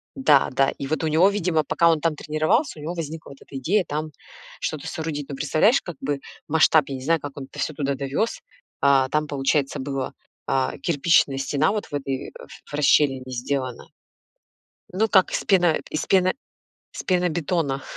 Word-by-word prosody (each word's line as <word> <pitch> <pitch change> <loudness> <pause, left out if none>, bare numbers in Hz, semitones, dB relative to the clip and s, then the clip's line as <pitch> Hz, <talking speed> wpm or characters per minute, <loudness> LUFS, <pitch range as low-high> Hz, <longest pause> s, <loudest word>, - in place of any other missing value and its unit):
Да, 150 - +4
да, 135 +1 +2
и 135 - -5
вот 155 +2 -2
у - - +1
него, 165 +6 +4
видимо, 175 -6 0
пока 170 +2 +3
он 160 -2 +2
там 165 -2 +1
тренировался, 155 - 0
у - - -9
него 165 +4 -4
возникла 160 -1 -6
вот 140 - -12
эта 135 - -9
идея 185 +9 +1
там 155 +1 -3 0.5
что-то 155 -3 -4
соорудить. 150 -3 -4
Но 140 - -4
представляешь, 155 - +3
как 175 -4 -8
бы 140 +1 -2 0.3
масштаб, 160 0 +5
я 135 - -3
не 130 - -7
знаю, 165 +3 +2
как 145 -1 -8
он 135 - -6
это - - -12
всё 155 - -1
туда 140 -1 -1
довёз. 140 - -2 0.4
А, 135 -2 +4
там, 150 +1 0
получается, 140 0 0
была 135 -1 -3 0.7
кирпичная 145 -3 +2
стена 145 +5 +1
вот 210 -1 -2
в - - -18
этой, 135 -2 -3
э, - - -11 0.3
в - - -16
расщелине 140 -2 +3
сделана. 130 0 -3 1.1
Ну, 220 +4 +2
как 190 -3 +4
из - - -1
пено 175 -5 +3
из 155 - -2
пено 185 -1 +3 0.6
из - - -6
пенобетона. 170 -5 0
150 Hz, 185 wpm, -23 LUFS, 140-170 Hz, 1.1 s, масштаб